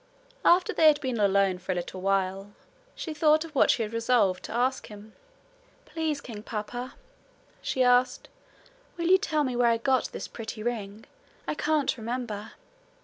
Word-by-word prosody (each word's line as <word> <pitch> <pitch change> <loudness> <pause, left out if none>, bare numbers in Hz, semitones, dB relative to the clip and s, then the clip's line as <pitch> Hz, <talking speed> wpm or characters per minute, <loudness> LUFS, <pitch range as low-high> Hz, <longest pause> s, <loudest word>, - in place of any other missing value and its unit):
After 355 0 +4
they 315 - +5
had 300 -1 +5
been 255 -5 -3
alone 195 -2 +2
for 185 +1 -3
a - - -6
little 180 +1 -5
while, 195 +1 -1 0.4
she 320 - -5
thought 310 +1 +3
of 320 - -12
what 275 - +4
she 230 - +3
had 215 +1 -6
resolved 230 -5 +2
to - - -8
ask 255 +3 0
him. 210 +1 -12 0.7
'Please, 315 -3 -3
king 225 -6 -8
papa,' 235 +4 -6 0.7
she 260 - -2
said, 250 0 +2 0.7
'Will 340 0 -1
you 375 +1 +6
tell 310 -7 0
me 255 -3 -2
where 240 -1 +3
I 230 - +2
got 260 +1 +1
this - - -6
pretty 220 -1 -7
ring? 220 -3 -4 0.4
I - - 0
can't 305 -2 0
remember.' 225 -2 -5
240 Hz, 170 wpm, -27 LUFS, 210-285 Hz, 0.7 s, you